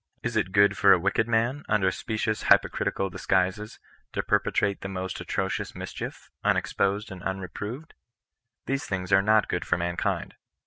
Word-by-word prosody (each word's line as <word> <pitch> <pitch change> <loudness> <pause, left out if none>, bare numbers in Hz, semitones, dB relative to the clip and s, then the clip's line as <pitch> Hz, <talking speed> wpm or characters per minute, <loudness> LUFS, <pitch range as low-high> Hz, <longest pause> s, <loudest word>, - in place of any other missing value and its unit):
Is 120 -1 -2
it 105 -4 +1
good 100 +1 +5
for 100 -1 +7
a - - +5
wicked 100 +5 +1
man, 120 +6 +1
under 95 -3 +3
specious 110 +2 -2
hypocritical 95 -1 +2
disguises, 95 +4 0 0.4
to - - -1
perpetrate 100 -1 +1
the - - -4
most 95 -1 -4
atrocious - - -2
mischief, - - -7
un - - +3
exposed 100 +2 -1
and 95 -1 -8
unreproved? 105 - -5 0.7
These 135 +1 -2
things 90 -1 -3
are 95 - +7
not 110 +1 +3
good 90 - -2
for 90 - 0
mankind. 85 0 -2
100 Hz, 160 wpm, -27 LUFS, 95-110 Hz, 0.7 s, for